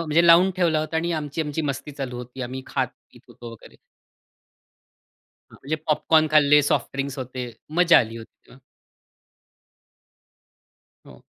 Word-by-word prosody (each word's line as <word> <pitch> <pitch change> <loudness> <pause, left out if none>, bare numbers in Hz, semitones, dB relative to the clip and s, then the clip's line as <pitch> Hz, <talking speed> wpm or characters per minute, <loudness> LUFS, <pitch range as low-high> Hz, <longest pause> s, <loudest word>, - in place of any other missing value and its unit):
म्हणजे 165 +1 +2
लावून 175 +3 +6
ठेवला 165 -4 +2
होता 155 +1 -4
आणि 170 +2 -1
आमची-आमची 155 0 -3
मस्ती 145 +1 -4
चालू 130 -3 -6
होती 125 +1 -8
आम्ही 130 +2 -6
खात-पीत - - -5
होतो 120 -1 -11
वगैरे. 115 - -15 1.8
हां, - - -14
म्हणजे 155 +4 -2
पॉपकॉर्न 155 +1 +2
खाल्ले, 150 -1 +5
सॉफ्ट 145 - 0
ड्रिंक्स 140 0 -4
होते, 125 -1 -6 0.3
मजा 175 -1 +6
आली 115 0 -2
होती 115 - -14
तेव्हा. 130 - -18 2.5
हो. - - -16
145 Hz, 130 wpm, -23 LUFS, 130-160 Hz, 2.5 s, लावून